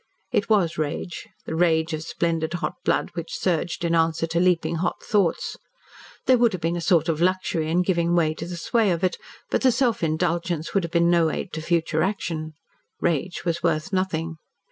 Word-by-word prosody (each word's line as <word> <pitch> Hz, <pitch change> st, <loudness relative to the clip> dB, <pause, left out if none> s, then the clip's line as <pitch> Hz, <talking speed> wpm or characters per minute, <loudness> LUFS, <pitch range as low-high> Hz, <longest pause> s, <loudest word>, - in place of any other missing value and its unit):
It -, -, 0 dB
was 175 Hz, -7 st, +2 dB
rage 155 Hz, +3 st, -3 dB, 0.2 s
the -, -, -4 dB
rage 160 Hz, -1 st, +2 dB
of 155 Hz, -, -2 dB
splendid 165 Hz, 0 st, -1 dB
hot -, -, -2 dB
blood -, -, +1 dB
which -, -, -5 dB
surged 175 Hz, -1 st, -1 dB
in 170 Hz, -, +1 dB
answer 165 Hz, 0 st, +2 dB
to 165 Hz, +1 st, -1 dB
leaping 170 Hz, -2 st, +2 dB
hot 180 Hz, +2 st, -2 dB
thoughts. 200 Hz, -6 st, 0 dB, 0.7 s
There 255 Hz, -2 st, +5 dB
would 235 Hz, -3 st, +4 dB
have 180 Hz, -, -4 dB
been 165 Hz, +1 st, +1 dB
a 175 Hz, -, -3 dB
sort 165 Hz, -2 st, +3 dB
of 165 Hz, -1 st, 0 dB
luxury 180 Hz, -3 st, +1 dB
in 175 Hz, +3 st, +2 dB
giving 170 Hz, -2 st, +1 dB
way 160 Hz, -3 st, +3 dB
to 160 Hz, -, -6 dB
the 175 Hz, 0 st, -5 dB
sway 220 Hz, +5 st, +1 dB
of 175 Hz, 0 st, -1 dB
it. 185 Hz, -, +1 dB, 0.3 s
But -, -, +1 dB
the 260 Hz, -, +5 dB
self 245 Hz, -2 st, +1 dB
indulgence 170 Hz, 0 st, -1 dB
would 195 Hz, -, +2 dB
have 170 Hz, -, -4 dB
been 170 Hz, 0 st, +3 dB
no 170 Hz, -2 st, +4 dB
aid 180 Hz, -, -4 dB
to 160 Hz, -, -3 dB
future 160 Hz, -1 st, +1 dB
action. 160 Hz, -5 st, -2 dB, 0.5 s
Rage 175 Hz, +2 st, -1 dB
was 170 Hz, -1 st, -1 dB
worth 165 Hz, +2 st, 0 dB
nothing. 165 Hz, -3 st, -1 dB
170 Hz, 200 wpm, -24 LUFS, 160-180 Hz, 0.7 s, There